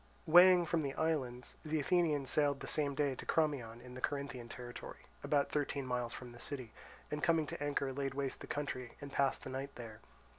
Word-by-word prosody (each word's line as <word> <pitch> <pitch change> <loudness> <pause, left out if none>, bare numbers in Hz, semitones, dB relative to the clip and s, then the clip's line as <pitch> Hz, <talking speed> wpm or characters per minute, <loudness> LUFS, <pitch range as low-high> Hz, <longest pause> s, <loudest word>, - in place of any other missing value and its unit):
Weighing 175 +2 +8
from 165 0 +1
the 140 -2 -3
islands, 130 -6 -1
the 155 0 0
Athenians 150 -3 +2
sailed 145 -2 +2
the - - -5
same 145 -2 0
day 145 -2 +1
to - - -7
Crommyon 135 -8 0
in 125 0 -11
the 130 - -8
Corinthian 140 -4 -3
territory, 120 0 -8 0.2
about 145 -1 +2
thirteen 140 -2 -1
miles 125 -2 -1
from 125 0 -7
the 120 - -12
city, 125 -4 -6 0.4
and 150 0 -2
coming 165 -1 +3
to 145 - -5
anchor 140 -2 0
laid 135 0 -2
waste 135 -1 -2
the - - -7
country, 130 -4 -3
and 140 -1 -8
passed 135 -1 +1
the 130 - -6
night 135 +2 -4
there. 115 -3 -8
140 Hz, 200 wpm, -36 LUFS, 125-150 Hz, 0.4 s, Weighing